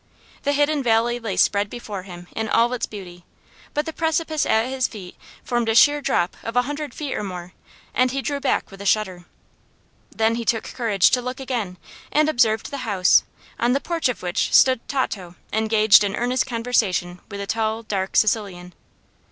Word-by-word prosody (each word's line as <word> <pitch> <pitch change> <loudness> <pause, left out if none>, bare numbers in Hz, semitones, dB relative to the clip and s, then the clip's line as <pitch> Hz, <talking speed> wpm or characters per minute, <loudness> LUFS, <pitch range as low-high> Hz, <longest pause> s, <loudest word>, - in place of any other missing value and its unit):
The 285 - 0
hidden 290 +1 +2
valley 240 0 +2
lay 225 -5 -4
spread 200 0 +2
before 210 -5 -6
him 175 -2 -10
in 220 0 -2
all 235 +2 +3
its 245 - -2
beauty, 180 -4 -10 0.5
but 295 +1 0
the 320 - -5
precipice 320 -1 0
at 220 +1 +3
his 260 -1 0
feet 190 -5 -10 0.3
formed 240 -2 -1
a 225 - +1
sheer 290 +4 +6
drop 175 -9 0
of 230 - -6
a 245 - +4
hundred 290 +2 -5
feet 290 -3 -4
or - - -3
more, 180 -3 -7 0.4
and 255 0 +3
he 270 +1 -3
drew 285 -1 -2
back - - -1
with 195 0 -11
a - - -7
shudder. 190 -4 0 0.8
Then 225 0 +1
he - - -4
took 225 0 0
courage 220 -7 +2
to 250 - +2
look 250 +2 -5
again, 235 -9 -3 0.3
and 305 +1 +3
observed 225 -3 +1
the 280 - -4
house, 205 -8 +3 0.3
on 240 +1 +2
the 275 - +2
porch 330 -2 -1
of 250 - -4
which 180 +3 -1
stood 260 -2 +6
Tato 195 -10 -3 0.2
engaged 220 -1 +5
in 200 0 -1
earnest 245 +1 0
conversation 225 -7 0
with 200 -1 -7
a 200 - -3
tall, 220 +1 -1
dark 195 -3 -3
Sicilian. 195 -5 0
225 Hz, 190 wpm, -22 LUFS, 200-260 Hz, 0.8 s, sheer